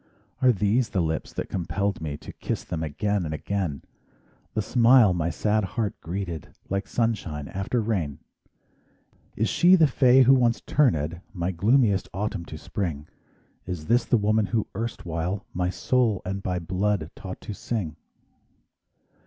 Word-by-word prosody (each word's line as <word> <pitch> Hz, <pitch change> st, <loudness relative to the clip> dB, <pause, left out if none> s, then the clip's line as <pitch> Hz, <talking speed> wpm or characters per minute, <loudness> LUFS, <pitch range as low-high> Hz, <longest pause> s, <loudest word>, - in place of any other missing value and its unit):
Are 130 Hz, -1 st, +6 dB
these 110 Hz, +3 st, +1 dB
the 95 Hz, -, -1 dB
lips 80 Hz, -2 st, -1 dB
that -, -, -4 dB
compelled 95 Hz, +2 st, -2 dB
me 75 Hz, -2 st, -4 dB
To -, -, -10 dB
kiss -, -, -4 dB
them 80 Hz, -, -4 dB
again 100 Hz, +6 st, -1 dB
and 80 Hz, -1 st, -3 dB
again? 90 Hz, -4 st, -3 dB, 0.7 s
The 110 Hz, -, +2 dB
smile 120 Hz, -4 st, +5 dB
my 85 Hz, -1 st, 0 dB
sad 105 Hz, +5 st, +1 dB
heart 105 Hz, +1 st, -2 dB
greeted 85 Hz, -2 st, -4 dB, 0.2 s
Like 100 Hz, +1 st, -1 dB
sunshine 95 Hz, -11 st, -1 dB
after 95 Hz, +6 st, -1 dB
rain? 95 Hz, -11 st, -1 dB, 1.2 s
Is 110 Hz, -, +1 dB
she 180 Hz, +2 st, +5 dB
the 165 Hz, -4 st, +6 dB
fay 130 Hz, -2 st, +5 dB
who 130 Hz, +2 st, +6 dB
once 120 Hz, -3 st, +3 dB
turned 85 Hz, -, +1 dB
My 90 Hz, 0 st, -1 dB
gloomiest 105 Hz, +3 st, +2 dB
autumn 95 Hz, -3 st, -2 dB
to 80 Hz, -, -8 dB
Spring? 75 Hz, -4 st, -4 dB, 0.6 s
Is 90 Hz, -4 st, -4 dB
this 120 Hz, +6 st, +3 dB
the 120 Hz, -, +2 dB
woman 105 Hz, 0 st, +2 dB
who 110 Hz, -1 st, 0 dB
erstwhile 95 Hz, -3 st, -3 dB
My 90 Hz, 0 st, 0 dB
soul 105 Hz, +5 st, +1 dB
and 95 Hz, +1 st, -3 dB
by 90 Hz, -1 st, -2 dB
blood 90 Hz, 0 st, -1 dB
taught 95 Hz, -2 st, -7 dB
to 105 Hz, -, -6 dB
sing? 100 Hz, -7 st, -3 dB
100 Hz, 155 wpm, -26 LUFS, 85-115 Hz, 1.2 s, Are